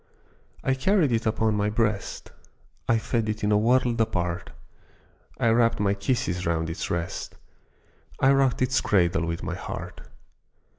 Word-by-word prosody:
I 135 - +2
carried 155 +2 +2
it 115 -1 0
upon 110 0 +1
my 105 0 +1
breast, 105 -2 -2 0.6
I 115 - +4
fed 110 0 -1
it 105 0 -3
in 105 - +2
a 105 - +5
world 120 +1 +2
apart, 90 -6 -2 0.9
I 115 - +3
wrapped 115 0 +3
my 100 -1 +2
kisses 100 -3 -1
round 80 -1 -1
its 80 - -4
rest, 85 -1 -4 0.8
I 135 - +5
rocked 135 -2 +2
its 130 0 +1
cradle 85 -3 +2
with 85 0 -4
my - - -3
heart. - - -7
110 Hz, 150 wpm, -25 LUFS, 95-120 Hz, 0.9 s, a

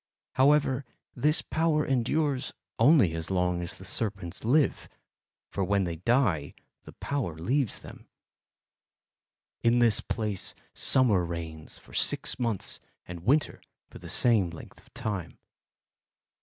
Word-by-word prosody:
However, 140 0 +3 0.3
this 150 +3 +2
power 155 -1 +1
endures 135 +1 0 0.3
only 120 - +5
as 80 0 -4
long 90 -2 0
as 85 - -5
the 95 - -11
serpents 100 -4 -2
live, 135 +5 +2 0.6
for 100 - -1
when 100 +1 +1
they 85 -2 -3
die 95 - +1 0.3
the - - -11
power 130 - -3
leaves 125 - -1
them. - - -13 1.5
In 115 +1 +3
this 115 -4 +4
place 105 -4 -3 0.2
summer 115 -9 +3
reigns 80 -2 -6
for - - -18
six - - +1
months 115 -6 -2 0.3
and 90 -1 -7
winter 145 +4 +2 0.3
for - - -11
the - - -9
same 110 -7 +3
length 85 - -11
of - - -24
time. 95 -6 -4
110 Hz, 130 wpm, -28 LUFS, 90-135 Hz, 1.5 s, only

